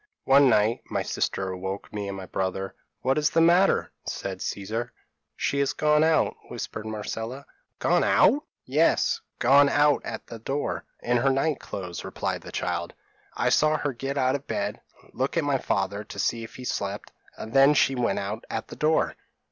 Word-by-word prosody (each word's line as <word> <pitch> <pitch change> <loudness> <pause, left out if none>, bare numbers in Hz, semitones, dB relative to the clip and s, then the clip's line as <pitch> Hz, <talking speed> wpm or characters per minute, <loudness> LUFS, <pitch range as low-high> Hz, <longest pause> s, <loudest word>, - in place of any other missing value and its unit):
p> - - -4
"One 140 0 +7
night, 110 +2 +3
my - - -1
sister 95 -1 -2
awoke 95 +2 -5
me 105 -1 -3
and 100 0 -5
my 95 - -7
brother. 95 +1 -3 0.3
"'What 135 +3 +2
is 150 - +2
the 165 - +2
matter?' 175 +4 +4
said - - -5
Caesar. 110 +4 -3 0.4
"'She 140 - -1
has 140 -1 +1
gone 150 0 +3
out,' 160 0 +3
whispered 110 - -6
Marcella. 110 +5 -5 0.3
"'Gone - - +2
out!' 295 +2 +4 0.2
"'Yes, - - +2 0.2
gone 140 +1 +6
out 145 0 +3
at 110 - -6
the 115 - -9
door, 135 +6 -3 0.2
in 120 0 +1
her 135 +3 +3
night 135 +2 +1
clothes,' 90 -3 -6
replied - - -3
the - - -10
child; - - -3 0.4
'I - - +1
saw 155 0 +3
her 145 -2 -2
get 135 +3 -4
out 130 -1 +2
of 140 0 -4
bed, - - -2 0.3
look 130 +6 -1
at 165 - +2
my 140 -2 +1
father 100 0 -1
to - - -10
see 115 -1 0
if 110 - -10
he 130 - -8
slept, 100 -4 -3 0.3
and 110 - -8
then 135 +2 +6
she 135 - +4
went 125 -2 0
out 105 +3 -4
at - - -4
the - - -8
door.' 155 +1 +1
130 Hz, 190 wpm, -26 LUFS, 105-145 Hz, 0.4 s, One